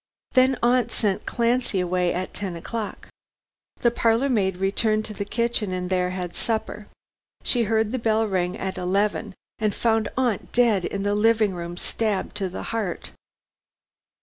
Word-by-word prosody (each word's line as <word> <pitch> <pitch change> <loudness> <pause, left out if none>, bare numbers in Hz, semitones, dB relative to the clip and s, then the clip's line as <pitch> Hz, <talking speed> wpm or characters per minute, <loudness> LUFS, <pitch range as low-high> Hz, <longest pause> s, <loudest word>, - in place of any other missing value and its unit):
Then 260 0 +4
aunt 240 -1 +3
sent 200 -3 -1
Clancy 240 -3 +1
away 180 0 +1
at 185 +1 -3
ten 195 -4 -4
o'clock. 210 +5 -5 0.7
The 235 - +4
parlor 230 +3 +2
maid 190 -7 +1
returned 215 +3 +1
to 215 - -7
the 200 0 -4
kitchen 230 -2 0
and 180 0 -3
there 180 -1 +2
had 180 -1 -4
supper. 220 -2 -2 0.6
She 240 -2 +2
heard 220 0 +1
the 260 - -1
bell 225 -1 +2
ring 185 -1 -1
at 190 -1 -4
eleven, 200 +2 0 0.2
and 215 -2 0
found 225 -2 +1
aunt 245 -7 0
dead 225 -7 +3
in 195 0 -3
the 205 0 +1
sitting 215 -1 +3
room, 175 0 -6
stabbed 210 0 -2
to 195 -2 -1
the 180 - -6
heart." 210 -6 -3
210 Hz, 160 wpm, -24 LUFS, 185-230 Hz, 0.7 s, Then